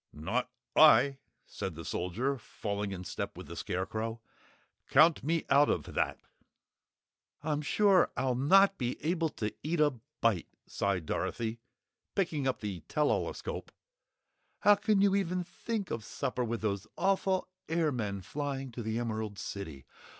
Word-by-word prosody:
"Not 100 +13 -2 0.3
I," 140 -3 +7 0.3
said 95 -4 -5
the 85 0 -8
Soldier, 120 - -1
falling 105 -2 -4
in 90 -1 -5
step - - -5
with - - -8
the - - -8
Scarecrow. 110 +5 -3 0.7
"Count 160 -3 +6
me 165 +3 0
out 145 +1 +5
of - - -1
that!" - - 0 1.2
"I'm 150 -1 0
sure 195 +4 +4
I'll 130 0 +1
not 195 +10 +5
be 125 -1 -1
able 165 -1 +1
to 105 -6 -4
eat 165 +2 -1
a 150 -1 +5 0.3
bite," 110 -7 +2 0.2
sighed 95 -4 -1
Dorothy, 115 +7 -2 0.6
picking 160 -8 0
up 130 - -1
the 100 -4 -4
tell 150 -1 +2
all - - +1
escope. - - -6 0.9
"How 205 - +7
can 205 0 +2
you 200 -1 +4
even 180 -2 0
think 210 +3 -4
of 115 - -3
supper 125 +2 -2
with 115 -1 -2
those 100 -1 -1
awful 190 -1 +1 0.2
airmen 125 - 0
flying 135 +2 -4
to 120 - -6
the 110 0 -2
Emerald 110 -3 -3
City. 80 -12 -6
130 Hz, 150 wpm, -31 LUFS, 105-165 Hz, 1.2 s, I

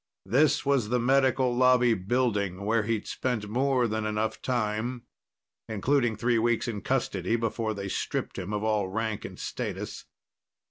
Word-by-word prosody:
This 145 +10 +3
was 135 -6 +2
the 125 +1 +2
Medical 130 0 +3
Lobby 125 -1 +5
building, 100 -2 0
where 110 +1 +2
he'd 110 0 -2
spent 120 -5 -2
more 130 +2 +1
than 110 0 -2
enough 110 +1 -2
time, 120 0 -1 0.7
including 120 +2 +1
three 115 +2 +1
weeks 120 +1 +1
in 105 -4 -3
custody 115 -6 0
before 115 -1 -1
they 100 0 -4
stripped - - -3
him 95 +2 -5
of 105 0 -2
all 105 -3 +1
rank 110 +2 -3
and - - -8
status. - - -5
115 Hz, 150 wpm, -28 LUFS, 105-125 Hz, 0.7 s, Lobby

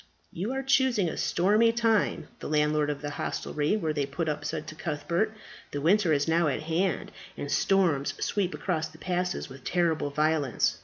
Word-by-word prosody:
"You 195 +8 -3
are 270 0 -2
choosing 260 -7 +3
a - - -3
stormy 210 +6 +3
time," 225 -3 +1
the - - -6
landlord 150 0 +2
of 145 0 -4
the 145 - -3
hostelry 150 +4 -1
where 160 -7 -1
they 145 -2 -1
put 160 +4 -3
up 150 -1 -2
said 150 - -3
to - - -8
Cuthbert. 170 +7 -1 0.4
"The 145 - -4
winter 175 +3 +3
is 145 0 +2
now 165 0 +3
at 145 +1 -1
hand, 165 +2 -1 0.3
and 145 - -4
storms 170 -8 +2
sweep 195 -3 -1
across 160 -4 -1
the 160 0 -16
passes 180 +1 -2
with 135 -1 -12
terrible 165 -4 +1
violence. 150 -2 +1
160 Hz, 185 wpm, -28 LUFS, 150-195 Hz, 0.4 s, choosing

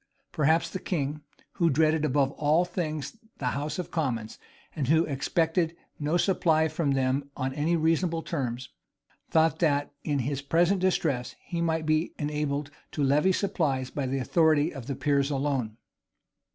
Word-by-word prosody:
Perhaps 160 +2 +2
the 185 - -4
king, 150 -5 -2 0.3
who 170 -3 +2
dreaded 155 +1 +2
above 140 -2 +2
all 155 +5 +2
things 165 0 -4 0.2
the 125 - -1
house 145 +2 -3
of 180 - -5
commons, 120 -9 -2 0.4
and 145 -6 -1
who 160 +3 +4
expected 160 +4 0 0.2
no 150 +3 +1
supply 165 -4 +2
from 155 -2 0
them 135 +1 0
on 130 0 -2
any 155 +4 +1
reasonable 165 +1 +1
terms, 125 -5 -3 0.6
thought 160 -2 +3
that, 145 -4 +1
in 145 -2 0
his 135 +2 -2
present 170 +6 +2
distresses, 155 -9 0
he 170 -1 -3
might 160 -1 0
be 155 +2 +1
enabled 145 -1 -2 0.2
to 150 - -1
levy 150 +7 +3
supplies 150 -10 0
by 140 -3 -2
the 135 +1 -1
authority 155 +3 +2
of 135 -5 -8
the 140 - -2
peers 140 0 +1
alone. 135 -6 -1
150 Hz, 155 wpm, -27 LUFS, 140-165 Hz, 0.6 s, who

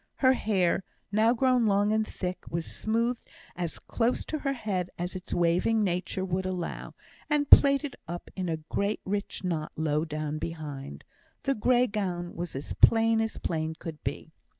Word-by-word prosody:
Her 260 -1 +5
hair, 195 -7 +1 0.3
now 215 +3 +4
grown 250 -2 +3
long 205 +1 +3
and 220 0 +1
thick, 180 -1 -5
was 165 0 -2
smoothed 230 +2 -1 0.3
as 175 -2 -3
close 235 +1 -1
to 310 - -3
her 275 -1 -1
head 195 -8 -2
as 180 +2 -3
its 185 - -7
waving 175 +6 +2
nature 185 0 -1
would 185 0 -1
allow, 180 -2 -4 0.3
and 295 -2 +1
plaited 280 0 +7
up 175 +1 -6
in 185 -2 -2
a 160 - 0
great 200 +7 -2
rich 200 0 -3
knot 165 -4 -2
low 155 -1 +1
down 155 -1 -3
behind. 150 -5 -6 0.4
The 275 - +2
grey 250 +2 +3
gown 185 -6 -3
was 175 -2 -4
as 135 - -4
plain 225 0 +5
as 220 0 -2
plain 160 -1 -2
could 160 -2 -8
be. 145 +4 -5
185 Hz, 170 wpm, -28 LUFS, 170-225 Hz, 0.4 s, plaited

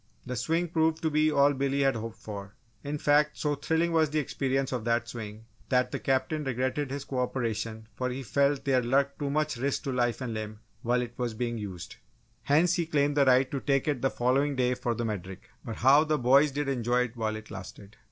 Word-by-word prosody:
The 125 - -4
swing 165 +8 0
proved 160 -1 +1
to 160 - +1
be 155 +1 +3
all 140 0 +4
Billy 140 +1 0
had 135 -2 +3
hoped 115 0 -6
for 100 -2 -8 0.3
it. 145 - -6
In 150 - -2
fact, 150 +1 +2
so 150 -1 0
thrilling 160 +4 0
was 160 -2 +3
the 155 - -2
experiences 135 -2 -1
of 125 -3 -2
that 120 0 +1
swing, 110 -1 -8 0.2
that 125 -1 +2
the - - -3
Captain 135 +3 0
regretted 130 +2 -1
his 140 +1 -4
co 135 -2 -4
operation 115 -3 -2
for 125 0 -2
he 130 +2 -5
felt 140 +2 +1
there 130 -2 +3
lurked 140 +3 +1
too 145 -1 -2
much 155 -2 0
risk 135 +3 -1
to 135 - -2
life 120 -2 0
and 125 -3 -4
limb 110 -1 -5 0.2
while 125 0 +1
it 120 -1 -8
was 120 -3 -2
being 120 0 -2
used. 95 -5 -7 0.4
Hence, 160 +5 +3
he 170 -2 -1
claimed 145 -2 +1
the 140 -1 +4
right 130 0 +4
to 140 - -2
take 135 0 0
it 145 -5 0
the 135 - +2
following 135 +4 +1
day 125 -1 +2
for 120 -1 -2
the 120 +1 -2
Medric. 95 -3 -6
But 115 -4 -5
how 140 +5 +5
the 155 -1 0
boys 135 +3 +5
did 145 +1 -3
enjoy 125 -2 +1
it 125 -1 -3
while 110 -2 -2
it 110 0 -9
lasted! 100 +2 -10
130 Hz, 230 wpm, -28 LUFS, 120-145 Hz, 0.4 s, how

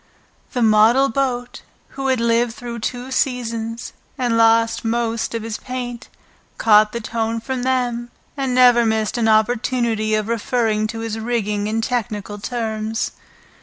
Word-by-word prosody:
The 245 - +1
model 225 +5 +5
boat, 245 -1 -2 0.3
who 270 0 -4
had 260 -2 +2
lived 230 0 +1
through 235 -1 -6
two 245 +3 -4
seasons 235 -3 -2 0.2
and 245 -2 0
lost 230 0 +3
most 230 0 -1
of 225 - -3
his 225 -1 -5
paint, 250 -1 -6 0.5
caught 215 -1 +5
the 235 - -3
tone 225 0 -2
from 255 +2 -4
them 245 -2 -1 0.3
and 270 -3 -1
never 245 -2 +6
missed 220 +1 0
an 225 - +2
opportunity 220 0 +1
of 215 -1 -1
referring 225 -1 0
to 225 +1 -6
his 225 -1 -4
rigging 210 -3 -1
in 220 +1 -1
technical 210 -4 -3
terms. 220 -1 -3
230 Hz, 145 wpm, -20 LUFS, 220-245 Hz, 0.5 s, never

